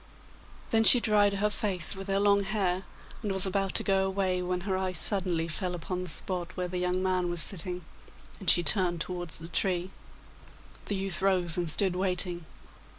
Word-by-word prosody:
Then 225 0 +3
she 245 - +8
dried 205 -3 +2
her 210 +1 0
face 195 -5 -2
with 195 0 -8
her 195 0 0
long 200 0 +3
hair, 190 -2 -2 0.4
and 210 -3 -3
was 190 -1 +1
about 195 0 -2
to - - +3
go 195 -1 +1
away, 190 -1 -1
when 180 0 -3
her 190 0 -2
eye 185 -1 -2
suddenly 175 -2 +2
fell 180 +2 -2
upon 180 +2 -5
the 180 - -6
spot 180 +2 +1
where 180 0 -2
the 180 0 -4
young 180 +1 -1
man 185 -1 0
was 175 -2 +4
sitting, 180 -2 -4 0.5
and 190 - +1
she 175 - +6
turned 175 0 +4
towards 175 0 -5
the 165 - -9
tree. 180 +1 -1 1.0
The 205 - -1
youth 190 -2 -3
rose 180 -4 +1
and 175 -2 -2
stood 180 +4 0
waiting. 180 -2 -3
185 Hz, 190 wpm, -28 LUFS, 175-195 Hz, 1.0 s, she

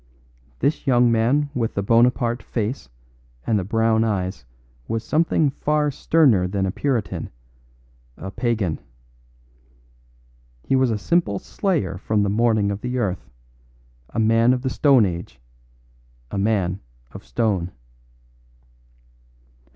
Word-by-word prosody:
This 145 0 0
young 120 -2 +4
man 130 +6 +1
with 115 -4 -2
the 100 - -1
Bonaparte 120 +2 +2
face 110 - -4 0.6
and 110 -2 +1
the - - -2
brown 115 +2 +2
eyes 95 - -2 0.4
was 115 -1 -2
something 155 -2 +1
far 150 +1 0
sterner 130 - +3
than 95 +1 -1
a 95 - -1
puritan 125 -2 -2 0.9
a 95 - -7
pagan. 105 -6 -1 1.8
He 135 - +1
was 130 -1 +3
a 110 - 0
simple 170 - +1
slayer 105 - -2
from 105 +1 0
the 100 - 0
morning 110 -2 +2
of 100 +1 -5
the 125 +1 -3
earth; 100 -7 -2 0.8
a - - -9
man 115 +2 +4
of 125 0 -3
the 130 - -1
stone 135 -6 +4
age 85 -6 -5 0.9
a - - -3
man 95 -3 0 0.3
of - - -10
stone. 90 - -1
115 Hz, 125 wpm, -22 LUFS, 100-130 Hz, 1.8 s, young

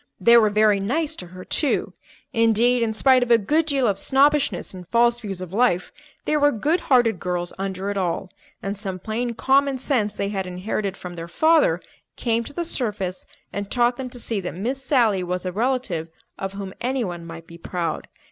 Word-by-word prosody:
They 235 - +6
were 220 -2 +6
very 210 -1 +3
nice 300 +10 -1
to 180 - -8
her, 185 +1 -11
too. 295 - 0 0.4
Indeed, 230 +1 +3
in 230 -1 +1
spite 255 +3 +4
of 245 - -1
a 235 - +7
good 300 +10 +1
deal 275 -4 +2
of 200 -3 +1
snobbishness 285 -2 +2
and 180 -2 -10
false 235 +3 +3
views 195 -5 -6
of 185 0 -7
life, 200 -6 +2 0.3
they 305 - +1
were 290 0 +4
good 300 - +1
hearted 235 -7 +4
girls 175 -1 -3
under 195 0 -3
it 200 - -3
all; 180 0 -2 0.3
and 195 +1 -2
some 190 -2 -4
plain 230 +5 -3
common 275 +2 +2
sense 235 -6 0
they 200 - -1
had 195 -2 -3
inherited 190 +2 -3
from 180 -1 -8
their 170 -1 -7
father 295 - +3 0.3
came 230 -1 0
to - - -7
the 345 - -2
surface 205 - -3 0.3
and 200 0 -4
taught 240 0 +2
them 260 -1 -5
to 245 - -7
see 225 -3 -2
that 180 - -5
Miss 255 +8 -3
Sally 235 -8 +3
was 180 +1 -3
a 185 - -1
relative 220 -6 -1 0.3
of 195 0 -5
whom 195 -1 -6
anyone 235 -10 -2
might 165 0 -9
be 170 -1 -13
proud. 170 -1 -3
215 Hz, 200 wpm, -23 LUFS, 185-250 Hz, 0.4 s, a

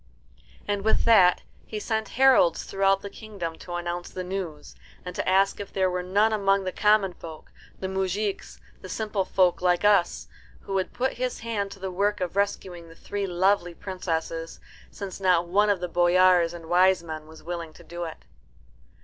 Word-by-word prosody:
And 205 -1 -1
with 220 +2 +1
that 190 -6 +5 0.2
he 215 - -6
sent 220 0 -2
heralds 260 -10 +5
throughout 195 0 +1
the 200 - -5
kingdom 195 -7 -6
to 175 - -7
announce 175 0 -4
the 185 - -6
news, 180 -5 -6 0.3
and 180 0 -6
to - - -1
ask 195 +1 +3
if 200 - -7
there 190 -1 +1
were 180 0 -2
none 205 +5 +2
among 195 -2 +2
the 185 - -3
common 210 -3 +3
folk, 160 -2 -11 0.3
the 190 - -3
moujiks, 190 +2 -3 0.2
the 185 - -9
simple 210 0 -2
folk 185 -2 +2
like 180 +1 +2
us, 200 -4 +3 0.3
who 195 - -7
would 190 -1 -1
put 260 +2 -1
his 250 -1 -2
hand 220 -3 -2
to 195 - -15
the 190 0 -4
work 205 +3 0
of 180 -1 -3
rescuing 185 -4 -2
the 165 - -14
three 200 +2 -4
lovely 180 -1 +1
princesses, 165 -3 -4 0.3
since 200 -1 -7
not 180 -3 +2
one 205 +4 +3
of 200 -3 +1
the 180 - -2
boyars 175 0 +4
and 170 -1 -9
wise 180 +1 +3
men 155 -2 -7
was 160 0 -14
willing 170 -1 -5
to - - -15
do 175 0 -6
it. 160 - -9
185 Hz, 185 wpm, -26 LUFS, 175-200 Hz, 0.3 s, that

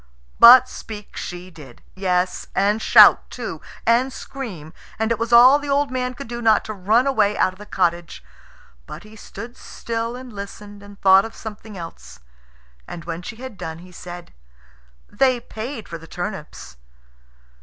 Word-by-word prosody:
But 250 +2 +9
speak 210 -4 -10
she 180 +1 -7
did 145 -7 -15
yes, 180 -1 -1
and 205 +3 +1
shout - - +6
too - - -7 0.2
and 245 +3 +3
scream 215 - -8 0.2
and 220 +1 -1
it 230 - 0
was 230 +1 -3
all 250 +4 +8
the 290 0 -7
old 280 -1 +1
man 250 0 -3
could 275 +1 -9
do 240 0 -6
not 220 -2 +3
to 215 - -5
run 215 +6 +2
away 215 -7 +1
out 185 - +2
of 185 - -20
the 210 - -11
cottage. 175 -3 -2 0.6
But - - -9
he 215 +1 -15
stood 230 +3 -10
still 230 -1 -5
and 250 -2 -10
listened, 205 0 -9
and 205 0 -14
thought 190 0 +6
of 225 - -8
something 215 -1 -9
else; 165 - -10 0.7
and 165 - -9
when 170 0 -5
she 200 - -8
had 245 -3 -10
done 160 0 -6
he 180 +2 -14
said, 175 0 -10 0.7
"They 255 -2 +1
paid 230 +1 -7
for 170 - -7
the 165 - -14
turnips." 175 - -7
210 Hz, 170 wpm, -21 LUFS, 180-240 Hz, 0.7 s, But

